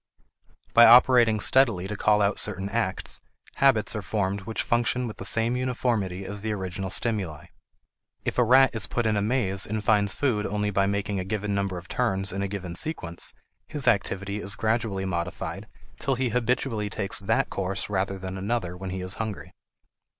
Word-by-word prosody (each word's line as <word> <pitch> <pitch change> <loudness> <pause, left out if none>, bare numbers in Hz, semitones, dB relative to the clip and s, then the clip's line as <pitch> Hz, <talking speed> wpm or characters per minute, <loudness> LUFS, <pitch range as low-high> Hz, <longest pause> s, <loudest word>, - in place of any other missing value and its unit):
By 120 - +8
operating 120 -2 +6
steadily 110 -6 +3
to 105 - -4
call 105 0 +3
out 100 - +1
certain 100 -1 -3
acts, 105 -3 -1 0.4
habits 125 -5 +3
are 110 - -2
formed 100 -1 -2
which 110 +3 -3
function 120 +1 0
with 110 - -7
the - - -7
same 115 +2 +2
uniformity 120 -7 -1
as 100 +1 -5
the 110 0 -2
original 95 -1 -4
stimuli. 95 -8 -1 0.8
If - - -1
a - - +6
rat 130 +3 +5
is 115 -3 +2
put 120 - -1
in 110 -1 +2
a 100 - +1
maze 100 -4 0
and 110 0 -3
finds 105 -2 +3
food 110 -4 0
only 105 0 -1
by 100 0 +2
making 100 0 -1
a - - -2
given 105 +1 -3
number 100 -2 -1
of 90 0 -9
turns 95 -5 0
in 100 +1 -3
a 100 - -1
given 95 -3 -6
sequence, 85 - -1 0.3
his 145 -5 -1
activity 100 -2 +1
is 100 -1 -3
gradually 110 -3 -1
modified 90 +2 -4 0.3
till 135 - 0
he 125 0 0
habitually 115 -2 -1
takes 100 0 -3
that 110 +2 0
course 95 0 -3
rather 95 -1 -1
than 95 0 -6
another 100 -3 -2
when 95 +1 -6
he 95 0 -4
is 90 0 -2
hungry. 110 -3 -6
105 Hz, 185 wpm, -26 LUFS, 95-115 Hz, 0.8 s, By